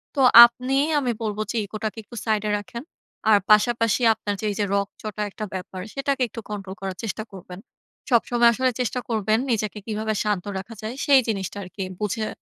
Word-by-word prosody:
তো 275 - +1 0.2
আপনি, 250 +3 -2 0.2
আমি 255 -4 -1
বলব 210 -2 -3
যে, 235 - -3
ইগোটাকে 215 +2 -5
একটু 235 - -13
সাইডে 215 -1 0
রাখেন। 235 +4 -8 0.5
আর 210 - +7
পাশাপাশি 230 +2 +3
আপনার 205 -2 -4
যে - - -3
এই - - -5
যে 205 - +2
রগচটা 205 +1 -4
একটা 215 - -5
ব্যাপার, 185 0 -6
সেটাকে 275 0 -1
একটু 230 - -8
কন্ট্রোল 195 -2 -6
করার 190 -1 -4
চেষ্টা 215 0 -3
করবেন। 180 -1 -10 0.5
সবসময় 235 0 +4
আসলে 255 +2 +1
চেষ্টা 250 +1 -1
করবেন 220 -1 +1
নিজেকে 215 -2 -1
কীভাবে 220 0 -2
শান্ত 205 -4 -1
রাখা 210 +4 -9
যায়, 220 +3 -5
সেই 275 -3 +6
জিনিসটা 200 -3 -3
আরকি 190 +2 -7 0.2
বুঝে 215 +1 -2
215 Hz, 180 wpm, -23 LUFS, 205-235 Hz, 0.5 s, আর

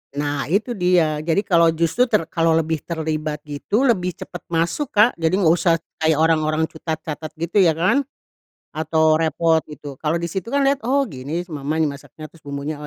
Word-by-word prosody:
Nah 145 0 -2
itu 205 - 0
dia, 180 -7 +2
jadi 165 +6 0
kalau 170 -2 +4
justru 170 +10 +1
ter 215 -6 +2
kalau 165 -1 +2
lebih 160 -1 0
terlibat 155 -2 -4
gitu 150 - -1
lebih 180 -9 +1
cepat 175 - -8
masuk 170 - -1
Kak. 215 +4 +6
Jadi 165 +2 +1
enggak 175 -5 +4
usah 170 0 +3 0.3
kayak 160 0 +2
orang-orang 155 0 +2
cutat 160 0 -3
catat, 155 0 -6
gitu 170 +5 0
ya 170 -5 +4
kan, 190 - +1 0.6
atau 155 0 +2
repot 165 +1 +2
gitu. 145 -2 -10
Kalau 155 0 -1
di 170 0 -2
situ 190 +1 -4
kan 280 - +3
lihat, 275 0 +2
"Oh, 275 +3 +2
gini 140 +6 -4
si 180 - -17
mamah 145 0 -3
nih 155 - +1
masaknya, 155 +2 -11
terus 165 - -21
bumbunya 140 +2 -4
oh 150 - -8
160 Hz, 195 wpm, -21 LUFS, 155-180 Hz, 0.6 s, Kak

